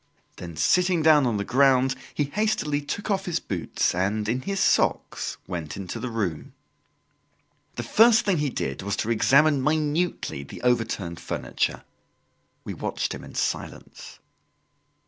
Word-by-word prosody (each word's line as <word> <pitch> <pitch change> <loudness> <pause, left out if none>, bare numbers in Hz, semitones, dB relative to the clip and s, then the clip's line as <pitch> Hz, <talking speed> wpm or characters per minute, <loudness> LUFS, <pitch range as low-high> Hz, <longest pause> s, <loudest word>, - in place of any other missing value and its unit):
Then 85 -2 -8
sitting 180 - +2
down 150 -4 +5
on 115 -3 0
the 100 - -1
ground, 135 +1 +4 0.2
he 150 - 0
hastily 150 -3 -1
took 205 +8 -4
off 195 -1 0
his 170 -1 0
boots 90 -4 -1
and, 100 +4 -1
in 125 +4 -1
his 195 +6 -3
socks, - - +1
went 85 -4 -5
into 100 +4 -6
the 125 +2 -4
room. 100 -9 -3 1.2
The - - -4
first 225 0 +5
thing 190 -6 +2
he 145 -1 0
did 70 - -4
was 100 +2 -2
to 115 - -2
examine 140 +5 +4
minutely 155 - -1
the 70 - -10
overturned 115 -8 0
furniture. - - -2 0.8
We - - -5
watched - - -3
him - - -8
in - - -12
silence. - - -4
130 Hz, 145 wpm, -25 LUFS, 100-160 Hz, 1.2 s, down